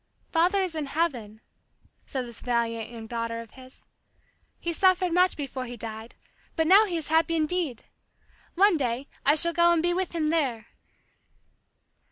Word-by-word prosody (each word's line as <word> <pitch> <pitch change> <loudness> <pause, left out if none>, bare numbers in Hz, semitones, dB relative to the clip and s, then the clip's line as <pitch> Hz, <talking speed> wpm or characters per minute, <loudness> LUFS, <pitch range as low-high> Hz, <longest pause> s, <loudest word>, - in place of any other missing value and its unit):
"Father 360 +4 +2
is 365 -3 -3
in 310 -3 -3
heaven," 245 -9 -2 0.7
said 260 -2 -3
this 235 -2 -11
valiant, 230 -2 -1
young 230 -2 -9
daughter 230 0 -4
of 230 -1 -10
his. 260 0 -16 0.7
"He 340 - -3
suffered 370 0 +3
much 365 +1 +3
before 270 -3 -5
he 240 0 -8
died, 220 +1 -8 0.4
but 320 - +1
now 395 +6 +7
he 355 -5 -3
is 315 - -5
happy 325 +1 +2
indeed! 310 -5 -1 0.7
One 390 -1 +4
day 255 0 -2 0.2
I 290 - +6
shall 340 +2 +4
go 340 +1 +4
and 335 -1 +2
be 350 0 +2
with 370 0 -2
him 310 -2 0
there." 265 -9 -1
305 Hz, 165 wpm, -26 LUFS, 235-340 Hz, 0.7 s, now